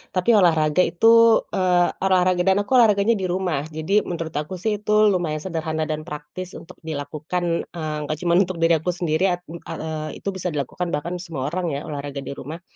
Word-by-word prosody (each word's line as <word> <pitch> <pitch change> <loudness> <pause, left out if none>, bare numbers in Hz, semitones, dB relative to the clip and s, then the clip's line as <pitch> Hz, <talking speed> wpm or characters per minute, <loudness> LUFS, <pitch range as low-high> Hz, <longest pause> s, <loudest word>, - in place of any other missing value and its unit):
Tapi 185 +4 +1
olahraga 160 -4 +3
itu, 230 +4 +5
eee, 180 -2 +2 0.2
olahraga, 185 -1 +3
dan 190 +1 +3
aku 205 - -10
olahraganya 220 -1 +4
di 190 - -2
rumah, 175 -5 -1
jadi 160 +7 0
menurut 165 -2 -4
aku 150 +4 -4
sih 215 +1 0
itu 210 +1 0
lumayan 170 -6 -1
sederhana 160 -2 -3
dan 155 0 -3
praktis 150 +5 -8
untuk - - -11
dilakukan, 160 +3 -3
eee, 155 -3 -4
nggak 155 +1 -3
cuma 170 -1 +1
untuk 185 -2 +1
diri 165 0 +4
aku 175 +3 -2
sendiri, 170 0 0
at 175 - -5
eee, 160 -2 -6
itu - - -2
bisa 185 -3 -4
dilakukan, 150 +5 -3
bahkan 170 +4 -2
semua 160 -7 -4
orang 170 -1 -2
ya, 140 - -3
olahraga 140 -1 -5
di 135 - -7
rumah. 160 +5 -7
170 Hz, 190 wpm, -22 LUFS, 155-185 Hz, 0.2 s, itu